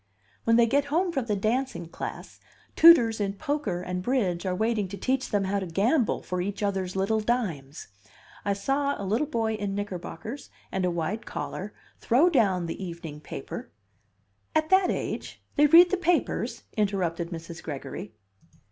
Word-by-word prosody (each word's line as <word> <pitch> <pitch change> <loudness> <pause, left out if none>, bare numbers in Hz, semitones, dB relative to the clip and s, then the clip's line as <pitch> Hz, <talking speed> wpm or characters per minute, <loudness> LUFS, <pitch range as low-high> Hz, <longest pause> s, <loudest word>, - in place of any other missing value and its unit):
When 230 - +4
they 235 0 +6
get 280 +5 +2
home 340 +5 +1
from 270 -7 -1
the 210 -3 0
dancing 220 -2 -1
class, 165 - -7 0.4
tutors 235 -10 +7
in 195 -1 0
poker 215 - -2
and 180 0 -3
bridge 195 -6 0
are 180 - 0
waiting 220 0 0
to 200 +2 -7
teach 260 +6 -1
them 205 -1 +1
how 195 +1 0
to 190 - -4
gamble 220 - +1
for 180 0 -2
each 200 +2 -3
other's 190 -2 -1
little 200 +3 +1
dimes. 190 - -2 0.6
I 200 - +1
saw 275 +8 0
a 200 - -4
little 225 +10 +1
boy 225 -6 0
in 205 -2 -3
knickerbockers 205 - -6 0.2
and 190 -1 0
a - - +2
wide 175 +6 -3
collar 205 +3 -5 0.2
throw 295 +10 +4
down 195 - +2
the 165 +3 -5
evening 170 -4 -7
paper - - -7 0.4
" 100 0 -43
"At 315 +1 +1
that 380 -1 +5
age? - - -3 0.2
They 295 0 +6
read 345 +4 +8
the 380 - +2
papers?" 355 -1 0
interrupted 180 -5 0
Mrs. 165 0 -7
Gregory. 135 -7 -7
205 Hz, 170 wpm, -27 LUFS, 180-260 Hz, 0.6 s, read